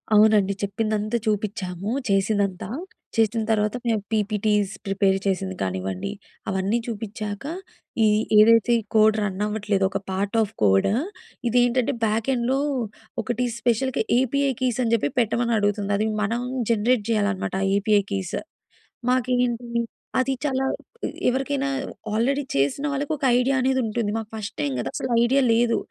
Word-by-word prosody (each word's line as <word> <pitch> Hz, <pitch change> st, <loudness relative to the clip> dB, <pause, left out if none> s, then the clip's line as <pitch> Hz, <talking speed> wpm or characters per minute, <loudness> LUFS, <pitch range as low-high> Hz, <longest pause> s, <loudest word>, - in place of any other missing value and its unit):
అవునండి. 210 Hz, -2 st, +5 dB
చెప్పిందంతా 215 Hz, +2 st, -1 dB
చూపించాము 205 Hz, -3 st, -2 dB, 0.2 s
చేసిందంతా. 195 Hz, -2 st, +1 dB, 0.5 s
చేసిన 225 Hz, 0 st, +2 dB
తర్వాత 210 Hz, +1 st, +1 dB
మేము 220 Hz, -3 st, +1 dB
పీపీటీస్ 210 Hz, -1 st, +1 dB
ప్రిపేర్ 195 Hz, -1 st, +2 dB
చేసింది 190 Hz, -1 st, -1 dB
కానివ్వండి, 95 Hz, -, -2 dB, 0.4 s
అవన్నీ 190 Hz, +4 st, 0 dB
చూపించాక, 215 Hz, -2 st, -5 dB, 0.6 s
ఈ -, -, +5 dB, 0.3 s
ఏదైతే 230 Hz, +2 st, +6 dB
ఈ -, -, -4 dB
కోడ్ 215 Hz, 0 st, +6 dB
రన్ 195 Hz, -2 st, -2 dB
అవ్వట్లేదో, 210 Hz, -2 st, 0 dB
ఒక -, -, -1 dB
పార్ట్ 200 Hz, +3 st, -2 dB
ఆఫ్ 210 Hz, -, -1 dB
కోడ్ 95 Hz, -1 st, +4 dB, 0.6 s
ఇదేంటంటే 245 Hz, +3 st, +2 dB
బ్యాక్ 220 Hz, +1 st, +1 dB
ఎండ్‌లో 255 Hz, +2 st, +1 dB, 0.6 s
ఒకటి 245 Hz, +3 st, -1 dB
స్పెషల్‌గా 245 Hz, +2 st, +1 dB, 0.2 s
ఏపీఐ 275 Hz, +2 st, +1 dB
కీస‌ని 250 Hz, -2 st, +1 dB
చెప్పి 145 Hz, -11 st, 0 dB
పెట్టమని 235 Hz, +1 st, +1 dB
అడుగుతుంది. 205 Hz, 0 st, 0 dB
అది 215 Hz, +2 st, +1 dB
మనం 230 Hz, +3 st, 0 dB, 0.3 s
జనరేట్ 230 Hz, +1 st, +2 dB
చేయాలనమాట 205 Hz, -3 st, 0 dB, 0.2 s
ఏపీఐ 205 Hz, 0 st, +3 dB
కీస్. 190 Hz, -3 st, -2 dB, 0.7 s
మాకేంటి 245 Hz, -1 st, 0 dB, 0.4 s
అది 260 Hz, +1 st, +2 dB
చాలా 265 Hz, -2 st, 0 dB, 0.6 s
ఎవరికైనా 270 Hz, +2 st, 0 dB, 0.4 s
ఆల్రెడీ 265 Hz, +6 st, +1 dB
చేసిన 140 Hz, -, +1 dB
వాళ్ళకి 285 Hz, +2 st, -2 dB
ఒక 280 Hz, -, -5 dB
ఐడియా 265 Hz, +2 st, +2 dB
అనేది 260 Hz, 0 st, +2 dB
ఉంటుంది. 220 Hz, -1 st, -1 dB
మాకు 220 Hz, -1 st, -6 dB
ఫస్ట్ 215 Hz, 0 st, -5 dB
టైమ్ 145 Hz, -2 st, -1 dB
కదా! -, -, -3 dB
అసలు 255 Hz, -, -3 dB
ఐడియా 270 Hz, +3 st, +3 dB
లేదు. 235 Hz, 0 st, +3 dB
215 Hz, 130 wpm, -24 LUFS, 200-240 Hz, 0.7 s, ఏదైతే